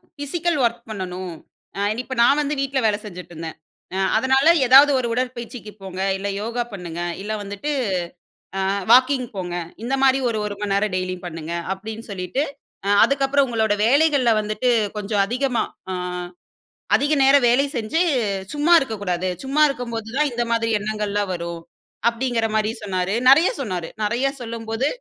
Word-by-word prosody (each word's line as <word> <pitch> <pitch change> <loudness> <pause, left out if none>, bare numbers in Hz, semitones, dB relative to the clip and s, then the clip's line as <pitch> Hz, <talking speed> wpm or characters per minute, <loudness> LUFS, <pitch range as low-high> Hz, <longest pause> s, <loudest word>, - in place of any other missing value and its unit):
Physical 320 +3 -1
work 235 0 +1
பண்ணணும். 185 -3 -5 0.7
இப்ப 260 0 -6
நான் 280 +4 +4
வந்து 295 0 -1
வீட்ல 270 0 0
வேல 210 -1 +2
செஞ்சுட்டுருந்தேன். 175 -4 -8 0.4
அ - - -1 0.2
அதனால 265 +4 +3 0.2
ஏதாவது 275 +3 +8
ஒரு 240 - -1
உடற்பயிற்சிக்கு 245 -2 -4
போங்க, 190 -1 -6 0.2
இல்ல 195 +1 -4
யோகா 235 +3 -2
பண்ணுங்க, 175 -3 -6 0.2
இல்ல 210 +2 -3
வந்துட்டு 205 +9 -4 0.9
அ - - 0 0.3
வாக்கிங் 255 +1 +5
போங்க. 180 -2 -4 0.3
இந்த 250 +3 -2
மாதிரி 265 0 +5
ஒரு 225 - -2
ஒரு 205 -1 -4
மணிநேரம் 200 0 0
டெய்லியும் 185 0 -3
பண்ணுங்க. 165 -1 -7 0.2
அப்டின்னு 220 +3 -8
சொல்லிட்டு, 185 +8 -2 0.6
அதுக்கப்புறம் 275 0 +2
உங்களோட 220 -3 +1
வேலைகள்ல 280 -1 +4
வந்துட்டு, 215 +4 0 0.3
கொஞ்சம் 205 -1 0
அதிகமா 250 0 0 0.3
அ - - -2 1.0
அதிக 290 +2 +2
நேரம் 270 -1 +5
வேல 250 +4 +4
செஞ்சு 230 +8 -1 0.5
சும்மா 300 +4 +3
இருக்கக்கூடாது. 200 - -2 0.2
சும்மா 275 +3 0
இருக்கும்போது 235 -5 -4
தான் 300 0 +2
இந்த 240 0 -1
மாதிரி 230 0 +1
எண்ணங்கள்லாம் 205 -1 -2
வரும். 170 -1 -5 0.5
அப்டீங்குற 235 -1 -1
மாதிரி 215 0 +1
சொன்னாரு. 185 -1 -1 0.2
நெறைய 315 +7 +7
சொன்னாரு. 180 -8 -4
நெறைய 240 +6 +1
சொல்லும்போது 230 +2 -3
230 Hz, 140 wpm, -22 LUFS, 200-265 Hz, 1.0 s, ஏதாவது